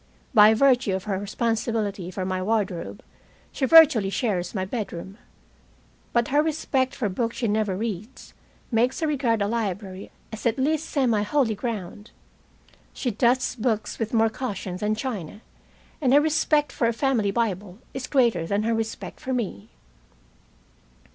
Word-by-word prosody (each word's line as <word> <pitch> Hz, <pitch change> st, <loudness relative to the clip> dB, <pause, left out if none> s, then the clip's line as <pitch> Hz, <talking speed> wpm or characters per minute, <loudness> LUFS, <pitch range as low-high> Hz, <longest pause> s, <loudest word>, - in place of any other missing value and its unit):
By 215 Hz, +1 st, +7 dB
virtue 245 Hz, -5 st, +3 dB
of 190 Hz, -, -4 dB
her 195 Hz, -2 st, -2 dB
responsibility 215 Hz, -2 st, -2 dB
for 185 Hz, 0 st, -4 dB
my 185 Hz, 0 st, -2 dB
wardrobe, 205 Hz, 0 st, -2 dB, 0.5 s
she 270 Hz, -, -1 dB
virtually 300 Hz, -10 st, +7 dB
shares 195 Hz, -4 st, -2 dB
my 190 Hz, -1 st, -1 dB
bedroom, 195 Hz, -1 st, -6 dB, 0.9 s
but 235 Hz, -1 st, +1 dB
her 290 Hz, +2 st, +4 dB
respect 285 Hz, -4 st, -1 dB
for 245 Hz, -6 st, -1 dB
books 230 Hz, +4 st, -2 dB
she 235 Hz, -, 0 dB
never 210 Hz, -3 st, 0 dB
reads 215 Hz, +2 st, -6 dB, 0.4 s
makes 245 Hz, +8 st, +1 dB
her -, -, +2 dB
regard 245 Hz, -8 st, +1 dB
a -, -, 0 dB
library 200 Hz, -4 st, -3 dB, 0.2 s
as 220 Hz, -, -2 dB
at 230 Hz, -, 0 dB
least 305 Hz, +4 st, 0 dB
semi 245 Hz, -8 st, +1 dB
holy 230 Hz, +1 st, +1 dB
ground. 210 Hz, -1 st, -5 dB, 0.8 s
She 250 Hz, -, -2 dB
dusts 245 Hz, +4 st, +1 dB
books 220 Hz, -3 st, -2 dB
with 225 Hz, -1 st, -2 dB
more 225 Hz, -1 st, +3 dB
caution 200 Hz, -7 st, -4 dB
than 210 Hz, +3 st, 0 dB
china, 215 Hz, -, -5 dB, 0.6 s
and 260 Hz, -3 st, +3 dB
her -, -, +8 dB
respect 300 Hz, -1 st, +2 dB
for 230 Hz, -, 0 dB
a 235 Hz, -, +1 dB
family 230 Hz, -4 st, +1 dB
Bible 200 Hz, -3 st, -2 dB, 0.2 s
is 265 Hz, -1 st, -5 dB
greater 235 Hz, -, +2 dB
than 200 Hz, +3 st, 0 dB
her 230 Hz, +1 st, +1 dB
respect 225 Hz, -1 st, -4 dB
for 260 Hz, -, -3 dB
me. 205 Hz, -, -3 dB
225 Hz, 155 wpm, -25 LUFS, 200-255 Hz, 0.9 s, her